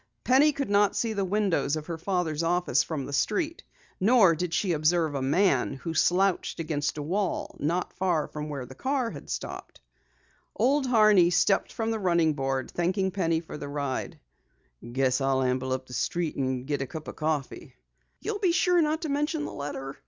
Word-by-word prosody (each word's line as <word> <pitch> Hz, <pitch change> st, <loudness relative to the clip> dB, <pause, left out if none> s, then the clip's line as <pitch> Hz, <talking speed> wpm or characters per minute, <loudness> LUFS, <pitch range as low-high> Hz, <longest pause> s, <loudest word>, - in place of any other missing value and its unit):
Penny 275 Hz, +4 st, +5 dB
could 275 Hz, -6 st, -3 dB
not 205 Hz, -1 st, +3 dB
see 230 Hz, -2 st, 0 dB
the 200 Hz, -2 st, -1 dB
windows 185 Hz, -8 st, +1 dB
of 155 Hz, -1 st, -5 dB
her 165 Hz, -1 st, -5 dB
father's 170 Hz, -4 st, -1 dB
office 170 Hz, -4 st, +2 dB
from 150 Hz, -5 st, -4 dB
the 140 Hz, -, -7 dB
street. 325 Hz, -, -1 dB, 0.4 s
Nor 200 Hz, -3 st, +5 dB
did 175 Hz, +1 st, -3 dB
she 180 Hz, +1 st, 0 dB
observe 160 Hz, 0 st, +2 dB
a 140 Hz, -, -2 dB
man 140 Hz, 0 st, +2 dB
who 160 Hz, +5 st, -5 dB
slouched 185 Hz, +3 st, +1 dB
against 155 Hz, -2 st, -2 dB
a 150 Hz, -, -3 dB
wall, 185 Hz, +5 st, -2 dB
not 170 Hz, +5 st, -1 dB
far 175 Hz, -5 st, 0 dB
from 150 Hz, 0 st, -6 dB
where 140 Hz, -4 st, -5 dB
the 130 Hz, -, -11 dB
car 260 Hz, -, -1 dB
had -, -, -10 dB
stopped. -, -, -6 dB, 0.8 s
Old 270 Hz, +2 st, +2 dB
Horney 215 Hz, -7 st, +5 dB
stepped 180 Hz, +3 st, +2 dB
from 225 Hz, 0 st, -2 dB
the 225 Hz, -, -2 dB
running 170 Hz, -5 st, +2 dB
board, 135 Hz, -2 st, -2 dB
thanking 190 Hz, +2 st, 0 dB
Penny 165 Hz, -4 st, 0 dB
for 160 Hz, -2 st, -9 dB
the 145 Hz, -, -6 dB
ride. 140 Hz, -2 st, -3 dB, 0.7 s
"Guess 130 Hz, +1 st, +1 dB
I'll 135 Hz, 0 st, +1 dB
amble 130 Hz, +1 st, -1 dB
up 130 Hz, 0 st, -2 dB
the 125 Hz, -, -12 dB
street 170 Hz, +4 st, -1 dB
and 130 Hz, -2 st, -2 dB
get 145 Hz, -1 st, -2 dB
a 135 Hz, -, -3 dB
cup 155 Hz, +1 st, -8 dB
of -, -, -7 dB
coffee." 155 Hz, -3 st, -3 dB, 0.5 s
"You'll 410 Hz, -, -3 dB
be 370 Hz, -4 st, +2 dB
sure 355 Hz, 0 st, +3 dB
not 310 Hz, +2 st, 0 dB
to 315 Hz, -, -3 dB
mention 295 Hz, +2 st, -1 dB
the -, -, -6 dB
letter?" 140 Hz, -1 st, -6 dB
170 Hz, 190 wpm, -27 LUFS, 145-205 Hz, 0.8 s, Penny